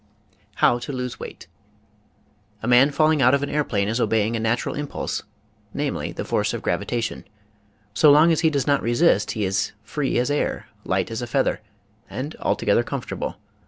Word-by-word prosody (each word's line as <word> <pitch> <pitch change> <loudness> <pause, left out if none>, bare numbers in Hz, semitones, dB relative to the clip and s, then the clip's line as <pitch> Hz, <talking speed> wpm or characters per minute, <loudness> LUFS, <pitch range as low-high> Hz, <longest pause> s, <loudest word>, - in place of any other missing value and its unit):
HOW 120 - +3
TO 120 - -6
LOSE 125 -2 -4
WEIGHT - - -9 1.2
A - - -2
man 125 +3 +6
falling 155 0 +2
out 125 +2 +5
of 140 - -1
an 145 - -3
airplane 115 -9 0
is 115 +3 -1
obeying 110 0 +1
a - - -1
natu 115 +2 0
ral - - -3
impulse, 145 0 -3 0.5
namely, - - -2
the - - -5
force - - 0
of - - -6
gravitation. 120 -1 -2 0.7
So 150 +8 +5
long 155 +4 +6
as 160 - +2
he 160 - +3
does 140 -3 -1
not 140 -1 +2
resist 120 - +2
he 105 -2 -1
is 95 +2 -1
free 140 +3 -2
as 125 +4 +1
air, 145 - -1 0.2
light - - -1
as 115 - -3
a 120 - -4
feather, 135 -1 0 0.5
and 145 +5 -5
altogether 105 +3 +2
comfortable. 125 +1 -5
125 Hz, 180 wpm, -23 LUFS, 115-145 Hz, 1.2 s, man